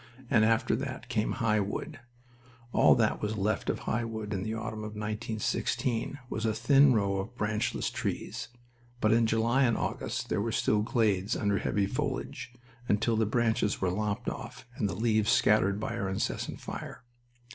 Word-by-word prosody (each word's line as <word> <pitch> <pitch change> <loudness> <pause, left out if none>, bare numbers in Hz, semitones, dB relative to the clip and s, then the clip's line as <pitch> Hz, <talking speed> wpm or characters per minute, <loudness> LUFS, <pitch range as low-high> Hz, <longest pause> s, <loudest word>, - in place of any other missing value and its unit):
And 110 - +5
after 115 +1 +3
that - - -5
came 105 - 0
High 115 -4 +1
Wood... 100 +3 -4 0.7
All - - +6
that - - +1
was 105 +1 -2
left 105 +2 0
of - - -1
High 115 +2 -1
Wood 110 -2 -4
in 95 - -2
the 110 +3 -3
autumn 110 -1 -4
of 105 0 -6
1916 110 +4 -2
was 110 - -4
a 110 -1 +1
thin 135 +4 +5
row 100 -3 +1
of 100 +5 -5
branchless 105 +2 -1
trees, - - -3 0.5
but 110 - +3
in 115 0 +4
July 115 +4 +2
and 115 -3 +2
August - - -3
there - - 0
were 115 +2 -1
still 105 -1 +2
glades 105 -2 +1
under 100 -3 +1
heavy 100 -1 0
foliage, 120 +5 -3 0.4
until 110 +3 +2
the 110 -1 +2
branches 110 -2 +1
were 90 -1 +1
lopped 105 +4 -2
off - - -6
and 105 - 0
the 95 - -3
leaves 110 0 +2
scattered 100 -3 +4
by 110 +2 -3
our 105 -4 -2
incessant 95 - -2
fire. - - -7
110 Hz, 175 wpm, -30 LUFS, 105-115 Hz, 0.7 s, All